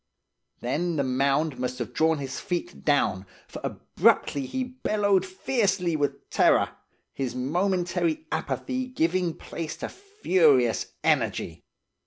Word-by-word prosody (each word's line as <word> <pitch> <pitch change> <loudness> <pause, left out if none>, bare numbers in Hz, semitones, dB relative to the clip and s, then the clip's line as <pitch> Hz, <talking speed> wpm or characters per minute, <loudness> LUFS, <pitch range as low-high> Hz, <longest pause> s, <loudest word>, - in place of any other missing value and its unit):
"Then 165 +8 -1
the 140 - +1
mound 135 +3 +1
must 125 0 -2
have - - -5
drawn 160 0 +3
his 135 -2 -5
feet 175 0 -4
down, 100 -10 +1 0.2
for - - -9
abruptly 140 -2 +1
he 260 - -2
bellowed 210 -6 +1
fiercely 190 -3 0
with 145 -2 -2
terror, - - +4 0.4
his 130 -3 -3
momentary 180 - 0
apathy 255 -1 -2
giving 180 -7 0
place 160 -2 -6
to - - -5
furious 175 - +2 0.2
energy. 85 0 0
165 Hz, 120 wpm, -26 LUFS, 135-195 Hz, 0.4 s, terror